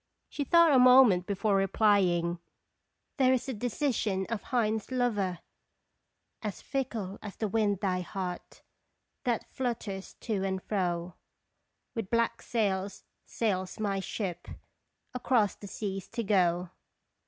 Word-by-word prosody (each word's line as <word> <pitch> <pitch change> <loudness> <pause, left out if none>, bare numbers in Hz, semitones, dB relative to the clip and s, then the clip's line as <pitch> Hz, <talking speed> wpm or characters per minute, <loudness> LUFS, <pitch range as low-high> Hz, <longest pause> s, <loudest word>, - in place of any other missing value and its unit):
She 290 - -3
thought 335 +3 +5
a 260 - +6
moment 250 -8 +7
before 200 +1 +1
replying: 190 -4 +2 0.4
" - - -52
There 260 -2 +4
is 255 - 0
the 265 - -3
decision 225 -4 -1
of 225 -3 -2
Heine's 220 -4 -1
lover: 215 -8 0 0.5
" - - -52
'As 210 -3 -4
fickle 230 -8 -3
as 205 -2 -8
the 220 - -2
wind 205 -2 +1
thy 185 -3 0
heart 180 0 -6 0.6
That 240 -3 0
flutters 225 -6 -4
to 205 -4 -1
and 190 -1 -1
fro; 175 -3 -1 0.8
With 225 -5 -4
black 230 0 +1
sails 200 -4 -1 0.2
sails 190 -3 -2
my 200 -2 0
ship, 190 -2 -4 0.7
Across 245 -4 +1
the 200 - -9
seas 195 -1 -4
to 230 0 -2
go." 180 -3 +2
205 Hz, 130 wpm, -30 LUFS, 190-235 Hz, 0.8 s, moment